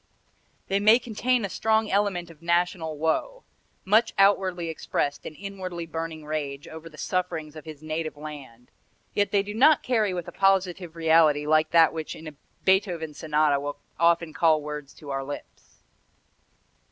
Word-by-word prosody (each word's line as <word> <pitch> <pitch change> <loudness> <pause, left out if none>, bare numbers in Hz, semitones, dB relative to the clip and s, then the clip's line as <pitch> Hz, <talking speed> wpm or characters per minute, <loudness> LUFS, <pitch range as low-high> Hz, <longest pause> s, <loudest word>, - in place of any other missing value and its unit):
They 195 +1 +1
may 215 +3 +6
contain 245 0 0
a - - -1
strong 220 +2 +1
element 190 -4 0
of 160 -1 -18
national 170 -2 0
woe, 325 - -1 0.4
much 220 +4 +3
outwardly 190 -3 +3
expressed 145 -2 -2
and 155 - -9
inwardly 185 -2 -6
burning 160 -1 -5
rage 145 -2 -4
over 160 +1 -9
the 155 - -16
sufferings 165 -5 -3
of 155 - -10
his 155 -1 -10
native 155 -1 -4
land; 140 -6 -10 0.4
yet 205 0 +1
they 200 -1 +2
do 205 +1 -6
not 285 +7 +5
carry 220 -5 +1
with 175 -2 -4
a - - -6
positive 185 -3 +1
reality 160 -3 +4
like 155 +1 +3
that 165 -1 +5
which 160 -1 -5
in 160 - -10
a 155 - -8 0.3
Beethoven 180 -5 +1
Sonata 150 -2 +1
will 145 +1 -5 0.2
often 170 -1 +3
call 160 -3 +3
words 150 -1 -6
to 145 -2 -9
our 135 0 -2
lips." 145 +1 -10
165 Hz, 165 wpm, -26 LUFS, 155-195 Hz, 0.4 s, may